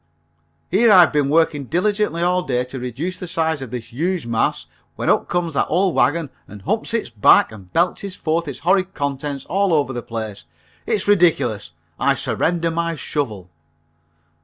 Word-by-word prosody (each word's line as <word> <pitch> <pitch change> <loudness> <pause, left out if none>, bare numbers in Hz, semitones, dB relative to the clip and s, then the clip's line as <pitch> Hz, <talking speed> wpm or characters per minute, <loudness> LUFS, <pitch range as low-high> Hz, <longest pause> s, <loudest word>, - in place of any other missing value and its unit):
Here 220 +5 +4
I've 180 -5 +7
been 145 -2 +1
working 150 -2 +2
diligently 180 - 0
all 180 +1 +2
day 125 -7 -1
to 130 +1 -8
reduce 135 +10 -4
the 180 - -6
size 160 -3 -1
of 130 - -6
this 120 -1 -7
huge 170 +4 -1
mass, 115 -1 0 0.3
when - - +1
up - - 0
comes 175 -2 -1
that - - +1
old 185 +1 +1
wagon 155 -1 +1 0.2
and 100 -1 -12
humps 225 - -1
its 225 - -2
back 110 0 +5
and 95 -4 -13
belches 185 +3 0
forth 160 +1 -1
its 140 - -6
horrid 190 +2 +1
contents 140 -1 -3
all 195 +1 +1
over 140 -3 0
the 120 - -4
place. 110 -5 -6 0.4
It's 200 - -1
ridiculous. 160 - +2 0.3
I - - +2
surrender 170 0 -1
my 170 0 -1
shovel." 110 - -4
160 Hz, 170 wpm, -20 LUFS, 125-180 Hz, 0.4 s, I've